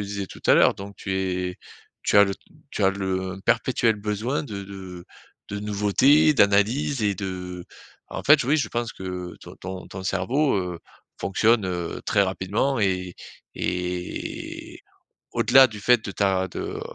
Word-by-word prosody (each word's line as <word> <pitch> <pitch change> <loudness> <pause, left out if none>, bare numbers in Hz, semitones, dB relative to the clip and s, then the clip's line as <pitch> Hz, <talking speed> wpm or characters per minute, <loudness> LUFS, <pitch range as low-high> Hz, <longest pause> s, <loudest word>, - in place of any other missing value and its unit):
disais 100 -1 -4
tout - - -12
à - - +7
l'heure, - - +5
donc 100 0 -9
tu 95 -1 -4
es 90 -1 -2 0.5
tu - - +2
as 100 - +9
le 100 - -2 0.4
tu - - -3
as - - +6
le 95 -1 -2
perpétuel 115 -1 +2
besoin 105 +6 -2
de 100 -8 -6
de 95 -3 -9 0.5
de 100 0 -4
nouveauté, 105 +9 +4
d'analyse 110 +4 +2
et 100 -1 +2
de 90 -2 -6 0.4
en - - -6
fait, - - +6
oui 145 +5 +3
je 125 -8 0
pense 120 -1 -3
que 90 -1 -6
ton - - -12
ton 95 0 -7
ton 95 0 -7
cerveau, 120 +10 +1
heu, 90 -2 -3 0.4
fonctionne, 105 +1 +2
heu, 90 -2 -4
très 100 - +3
rapidement 100 +8 -1
et 90 -2 0 0.4
et 90 0 -4 0.5
au-delà 135 +1 +6
du 105 -4 -10
fait 120 0 +3
de 100 - -4
ta 95 -2 +1
de, - - -8
heu - - -5
100 Hz, 165 wpm, -24 LUFS, 95-110 Hz, 0.5 s, as